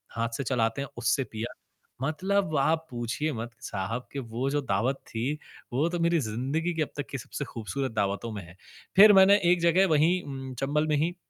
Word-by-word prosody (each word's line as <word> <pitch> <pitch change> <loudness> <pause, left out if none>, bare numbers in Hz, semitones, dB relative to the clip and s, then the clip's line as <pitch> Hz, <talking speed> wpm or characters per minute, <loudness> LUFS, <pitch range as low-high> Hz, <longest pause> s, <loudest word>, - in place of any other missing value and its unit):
हाथ 115 0 0
से 140 - -2
चलाते 115 0 0
हैं 140 - -4
उससे 120 +3 +1
पिया। 110 0 -6 0.5
मतलब 185 +2 0
आप 160 +3 +2
पूछिए 120 +6 -2
मत 115 0 -5
साहब 105 +6 -4
कि 140 - -3
वो 120 +2 -3
जो 145 - +1
दावत 125 +2 0
थी 120 +6 -2 0.4
वो 145 +6 +2
तो 175 -1 -3
मेरी 170 0 +3
ज़िंदगी 135 +9 -1
की 160 - -1
अब 150 - 0
तक 145 - -3
की 140 - -3
सबसे 140 +4 -6
ख़ूबसूरत 125 +3 -4
दावतों 100 +1 -1
में 100 - -5
है। 90 +2 -14 0.4
फ़िर 210 +1 +10
मैंने 195 +1 +7
एक 180 - +2
जगह 175 +3 +4
वही 165 +3 +3
उम, 135 -2 -7
चंबल 150 +3 +1
में 150 - +2
ही, 165 +4 0
140 Hz, 200 wpm, -28 LUFS, 115-160 Hz, 0.5 s, फ़िर